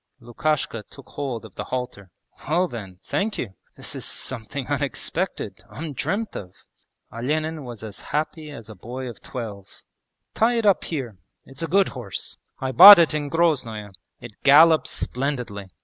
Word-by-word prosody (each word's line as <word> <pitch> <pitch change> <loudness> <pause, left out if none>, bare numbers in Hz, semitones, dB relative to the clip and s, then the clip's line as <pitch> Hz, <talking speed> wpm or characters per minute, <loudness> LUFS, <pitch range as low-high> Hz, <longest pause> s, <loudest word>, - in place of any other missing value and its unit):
Lukashka 120 0 -2
took 140 - -14
hold 130 -6 -4
of 105 - -13
the - - -6
halter. 125 -7 -5 0.4
'Well 175 +4 +2
then, 100 - -8
thank 205 +2 -2
you! 100 -6 -4 0.2
This - - -7
is - - -5
something 130 +2 -4
unexpected, 145 0 -2
undreamt 165 - -3
of.' 90 -2 -8 0.6
Olenin 155 +6 -2
was 120 -3 -9
as 105 -3 -8
happy 155 +1 -2
as 115 -7 -10
a 110 - -9
boy 125 +7 -7
of 120 - -9
twelve. 105 -6 -8 0.5
'Tie 235 +2 +2
it 230 - 0
up 200 -2 +3
here. 125 - -5 0.3
It's 135 +4 -11
a 165 - -1
good 195 +2 +3
horse. 120 -7 -6 0.2
I 130 0 -2
bought 195 +8 +12
it 165 -3 +4
in 145 -1 -2
Groznoe; 130 -11 0 0.3
it 120 - -9
gallops 155 +3 +6
splendidly! 125 -7 -3
135 Hz, 155 wpm, -24 LUFS, 115-155 Hz, 0.6 s, bought